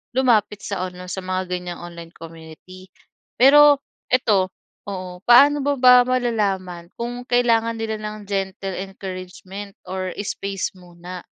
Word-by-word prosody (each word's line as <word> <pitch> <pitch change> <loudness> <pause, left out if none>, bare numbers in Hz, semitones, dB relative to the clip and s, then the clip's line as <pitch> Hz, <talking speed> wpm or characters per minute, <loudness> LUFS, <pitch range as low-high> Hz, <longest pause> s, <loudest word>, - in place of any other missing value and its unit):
lumapit 215 -5 +2
sa 195 -3 -3
online, 180 0 -10
sa - - -4
mga 185 0 -3
ganyang 180 -1 -4
online 170 -1 -10
community. 165 +3 -13 0.5
Pero 290 +2 +7 0.3
ito, 200 -7 +2 0.4
oo, 185 -2 -6
paano 285 +5 +6
mo 285 -2 0
ba 250 -1 +8
malalaman 200 -8 -2
kung 245 +1 -4
kailangan 230 -2 +2
nila 220 -1 -2
ng 215 0 -6
gentle 195 -1 -3
encouragement, 190 +1 -8 0.2
or 185 0 -4 0.2
space 195 -1 -4
muna? 180 0 -11
195 Hz, 125 wpm, -21 LUFS, 180-235 Hz, 0.5 s, ba